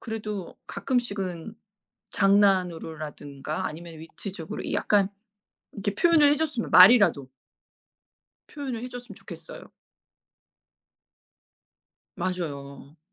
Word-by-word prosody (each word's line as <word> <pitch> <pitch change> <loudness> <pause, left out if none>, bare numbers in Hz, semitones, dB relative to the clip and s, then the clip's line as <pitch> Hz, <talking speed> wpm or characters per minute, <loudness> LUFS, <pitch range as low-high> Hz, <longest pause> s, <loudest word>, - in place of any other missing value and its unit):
그래도 210 -5 -6
가끔씩은 200 -7 -3 0.6
장난으로라든가 165 -7 0
아니면 165 +1 -8
위트적으로 165 +1 -7
약간 200 -2 +2 0.7
이렇게 200 0 -3
표현을 320 +1 +5
해줬으면 295 -5 -1
말이라도 185 - +7 1.2
표현을 265 -6 -5
해줬으면 245 -3 -8
좋겠어요. - - -11 2.5
맞아요. 150 -5 -5
195 Hz, 240 characters per minute, -26 LUFS, 160-230 Hz, 2.5 s, 말이라도